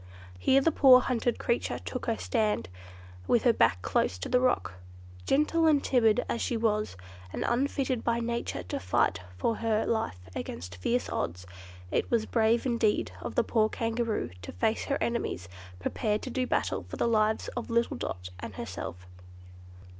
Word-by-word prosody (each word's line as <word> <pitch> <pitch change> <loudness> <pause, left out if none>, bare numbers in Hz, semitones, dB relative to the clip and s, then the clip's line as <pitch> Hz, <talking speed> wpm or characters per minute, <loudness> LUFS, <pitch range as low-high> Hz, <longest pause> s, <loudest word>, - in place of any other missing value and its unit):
Here 265 - +4
the 330 - +3
poor 265 -4 +8
hunted 245 -1 0
creature 235 - -1
took 255 - -6
her 225 -1 +1
stand, 210 - 0 0.6
with 235 - +3
her 240 - +5
back 95 - +2
close 90 - +1
to 90 - -5
the 250 - +4
rock. 250 - +1 0.5
Gentle 310 +3 +3
and 295 -3 +4
timid 240 -2 +3
as 235 - -2
she 235 - 0
was, 215 - 0 0.3
and - - -3
unfitted 260 0 0
by 235 0 +1
nature 235 - -3
to 90 - -4
fight 95 +1 +1 0.2
for 225 - 0
her 220 -1 +1
life 220 - -1 0.2
against 90 +2 -6
fierce 240 - 0
odds, 90 +2 -3 0.5
it - - 0
was 230 -2 +2
brave 230 +1 +2
indeed 235 -4 +1
of - - -5
the - - +4
poor 215 -2 +2
Kangaroo 225 - -1
to 90 - -7
face 220 - 0
her 280 - 0
enemies, 235 - -2 0.3
prepared 210 - -1
to 255 - -5
do 255 0 -1
battle - - 0
for - - -6
the - - +1
lives 220 -1 +2
of - - -5
little 235 0 +1
Dot 90 -6 -5
and - - -7
herself. 90 +1 -6
230 Hz, 170 wpm, -29 LUFS, 210-245 Hz, 0.6 s, poor